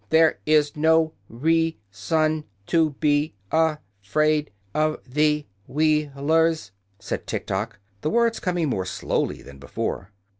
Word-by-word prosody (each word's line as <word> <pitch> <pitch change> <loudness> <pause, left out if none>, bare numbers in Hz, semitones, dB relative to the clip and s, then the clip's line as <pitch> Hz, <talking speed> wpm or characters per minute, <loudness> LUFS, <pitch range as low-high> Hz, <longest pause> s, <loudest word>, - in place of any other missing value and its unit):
"There 160 0 +4
is 150 -1 +3
no 160 +1 +3 0.2
rea 160 +6 +1
son 155 +9 0 0.2
to 160 +1 +2
be 145 -3 +2 0.2
a 160 -1 +3 0.2
fraid 150 +8 +1 0.2
of 155 0 +1
the 150 +2 +2 0.2
Wheel 150 -1 +1
ers," 160 -8 +2 0.3
said - - -5
Tiktok, - - -3 0.2
the 155 - 0
words 235 +2 +2
coming 175 -4 0
more 95 -8 -1
slowly - - -2
than 70 -1 -13
before. 95 +6 -4
155 Hz, 125 wpm, -24 LUFS, 145-160 Hz, 0.3 s, There